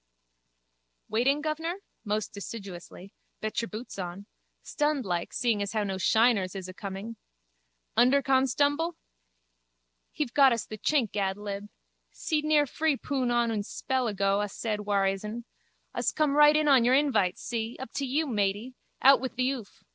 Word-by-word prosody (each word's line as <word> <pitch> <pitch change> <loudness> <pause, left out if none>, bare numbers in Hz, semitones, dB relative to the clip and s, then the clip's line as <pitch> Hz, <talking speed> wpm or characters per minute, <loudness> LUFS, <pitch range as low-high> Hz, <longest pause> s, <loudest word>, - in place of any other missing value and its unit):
_ - - -48 1.1
Waiting, 275 +7 +2
guvnor? 320 +3 -2 0.3
Most 210 -1 -2
deciduously. 195 -2 -9 0.3
Bet 215 +1 -2
your 230 - -5
boots 220 -1 -8
on. 180 +2 -6 0.4
Stunned 295 -3 -1
like, 175 -2 -2
seeing 230 -4 0
as 200 +1 -3
how 215 -1 +1
no 190 -2 -3
shiners 220 -3 +3
is 190 -1 -5
acoming. 195 +4 -7 0.8
Underconstumble? 275 +5 +3 1.2
He've 270 -6 -3
got 265 -5 +5
the 215 - -7
chink 260 -7 +1
ad 195 -1 0
lib. 205 0 -6 0.4
Seed 305 -2 -2
near 305 -1 +4
free 305 +1 0
poun 260 -3 -1
on 240 -1 +2
un 220 - -1
a - - -2
spell 260 +3 -2
ago 200 -1 +1
a 205 - -2
said 210 0 -4
war 200 -1 +2
hisn. 210 +4 -3 0.5
Us - - 0
come 300 -2 +1
right 295 0 +7
in 305 0 +2
on 270 -4 +6
your 250 +2 +4
invite, 265 -11 +2
see? 230 -1 -4
Up 265 -3 -7
to 280 - -2
you, 295 +5 +1
matey. 210 0 -1 0.3
Out 270 -1 +7
with 260 -2 -4
the 255 +1 +1
oof. 240 -7 -8
230 Hz, 160 wpm, -28 LUFS, 200-275 Hz, 1.2 s, right